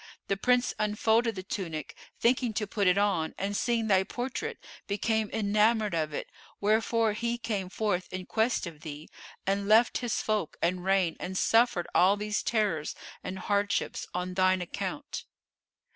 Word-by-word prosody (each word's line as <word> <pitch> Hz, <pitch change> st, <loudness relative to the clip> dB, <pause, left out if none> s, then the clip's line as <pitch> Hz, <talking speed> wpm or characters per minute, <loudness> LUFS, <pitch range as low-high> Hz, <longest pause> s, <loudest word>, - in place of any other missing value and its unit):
The 195 Hz, -, +2 dB
Prince 250 Hz, +4 st, +2 dB
unfolded 220 Hz, +2 st, +2 dB
the 185 Hz, -, -5 dB
tunic, 165 Hz, -5 st, -5 dB, 0.2 s
thinking 245 Hz, -1 st, +2 dB
to 210 Hz, +1 st, -1 dB
put 200 Hz, -1 st, 0 dB
it 180 Hz, +1 st, +4 dB
on, 195 Hz, -6 st, +1 dB
and 200 Hz, +1 st, -2 dB
seeing 230 Hz, +1 st, +1 dB
thy 195 Hz, -3 st, +4 dB
portrait, 265 Hz, -, -4 dB, 0.3 s
became 215 Hz, +1 st, 0 dB
enamoured 215 Hz, 0 st, +2 dB
of 155 Hz, -2 st, 0 dB
it; 145 Hz, -, -5 dB, 0.3 s
wherefore 220 Hz, +1 st, +2 dB
he 235 Hz, +2 st, -1 dB
came 210 Hz, -6 st, -3 dB
forth 195 Hz, -2 st, -1 dB
in 185 Hz, 0 st, -5 dB
quest 225 Hz, +3 st, +1 dB
of 160 Hz, -4 st, -9 dB
thee, 150 Hz, 0 st, -8 dB, 0.4 s
and 200 Hz, +1 st, 0 dB
left 225 Hz, +3 st, +5 dB
his 240 Hz, -3 st, -1 dB
folk 215 Hz, -7 st, -1 dB
and 180 Hz, +1 st, 0 dB
reign 190 Hz, -3 st, +2 dB
and 185 Hz, +1 st, -4 dB
suffered 225 Hz, -7 st, +3 dB
all 195 Hz, +3 st, +5 dB
these 210 Hz, 0 st, -1 dB
terrors 205 Hz, -9 st, 0 dB, 0.3 s
and 190 Hz, -, -5 dB
hardships 205 Hz, +1 st, -1 dB
on 180 Hz, +1 st, -3 dB
thine 185 Hz, 0 st, +3 dB
account." 200 Hz, +11 st, -5 dB
205 Hz, 160 wpm, -29 LUFS, 185-225 Hz, 0.4 s, left